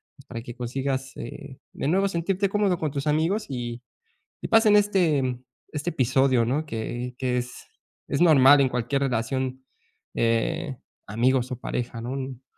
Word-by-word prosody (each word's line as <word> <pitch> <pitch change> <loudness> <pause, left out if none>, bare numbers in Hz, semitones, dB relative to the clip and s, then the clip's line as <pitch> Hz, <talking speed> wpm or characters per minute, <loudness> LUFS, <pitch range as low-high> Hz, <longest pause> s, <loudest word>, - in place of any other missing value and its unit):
pues 135 - -18
para 115 -2 -6
que 120 - -8
consigas, 130 +2 -3
eh, 130 +3 -8 0.2
de - - -3
nuevo 195 +4 +3
sentirte 190 +3 0
cómodo 200 -3 +1
con 155 -2 -1
tus 140 +1 -3
amigos 160 +8 +1
y, 120 -2 -4 0.6
y - - -2
pasen 225 -2 +5
este 160 -11 +2 0.4
este 150 +3 -2
episodio, 130 -3 +2
¿no?, 140 +7 -1
que 120 +1 -4
que 125 -1 0
es, 125 0 -4 0.6
es 145 - -1
normal 145 -4 +7
en 130 - +3
cualquier 125 +3 -1
relación, 130 +1 -2 0.5
eh, 130 +6 0 0.3
amigos 125 +4 +1
o 125 - -4
pareja, 120 -2 -4
¿no?, 120 +2 -5
un 135 -1 -5
135 Hz, 160 wpm, -25 LUFS, 125-155 Hz, 0.6 s, normal